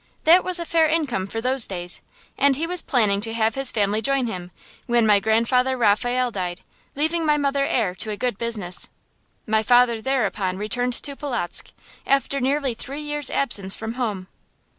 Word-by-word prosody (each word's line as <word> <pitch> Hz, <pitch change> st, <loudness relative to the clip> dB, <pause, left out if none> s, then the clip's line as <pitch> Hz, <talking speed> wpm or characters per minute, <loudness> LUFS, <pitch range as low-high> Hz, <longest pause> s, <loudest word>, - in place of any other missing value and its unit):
That 340 Hz, +4 st, +6 dB
was 365 Hz, -1 st, +2 dB
a 340 Hz, -, -2 dB
fair 325 Hz, -1 st, +2 dB
income 280 Hz, -, -1 dB
for 225 Hz, +3 st, -5 dB
those 255 Hz, 0 st, +2 dB
days, 180 Hz, -2 st, -3 dB, 0.3 s
and 280 Hz, -1 st, +3 dB
he 315 Hz, +5 st, -2 dB
was 360 Hz, +1 st, +3 dB
planning 210 Hz, -7 st, +1 dB
to 225 Hz, +1 st, -1 dB
have 220 Hz, -1 st, +1 dB
his 270 Hz, 0 st, +4 dB
family 210 Hz, 0 st, 0 dB
join 275 Hz, +2 st, +1 dB
him 180 Hz, -6 st, -6 dB, 0.4 s
when 240 Hz, -2 st, +2 dB
my 210 Hz, -2 st, +5 dB
Grandfather 235 Hz, +5 st, +1 dB
Raphael 245 Hz, +3 st, +1 dB
died, 180 Hz, -4 st, -4 dB, 0.3 s
leaving 320 Hz, +4 st, 0 dB
my 300 Hz, -1 st, +2 dB
mother 280 Hz, -1 st, 0 dB
heir 215 Hz, -7 st, 0 dB
to 215 Hz, -, -4 dB
a 210 Hz, -, -4 dB
good 245 Hz, -4 st, -2 dB
business. 215 Hz, -6 st, 0 dB, 0.6 s
My 220 Hz, -1 st, +1 dB
father 240 Hz, 0 st, +3 dB
thereupon 215 Hz, -7 st, -1 dB
returned 245 Hz, +5 st, -2 dB
to 280 Hz, +3 st, +1 dB
Polotzk, 250 Hz, -, -3 dB, 0.4 s
after 275 Hz, 0 st, +1 dB
nearly 270 Hz, 0 st, 0 dB
three 275 Hz, +6 st, -6 dB
years' 295 Hz, -2 st, 0 dB
absence 200 Hz, -8 st, 0 dB
from 225 Hz, 0 st, -6 dB
home. 215 Hz, -7 st, -3 dB
245 Hz, 180 wpm, -22 LUFS, 210-275 Hz, 0.6 s, That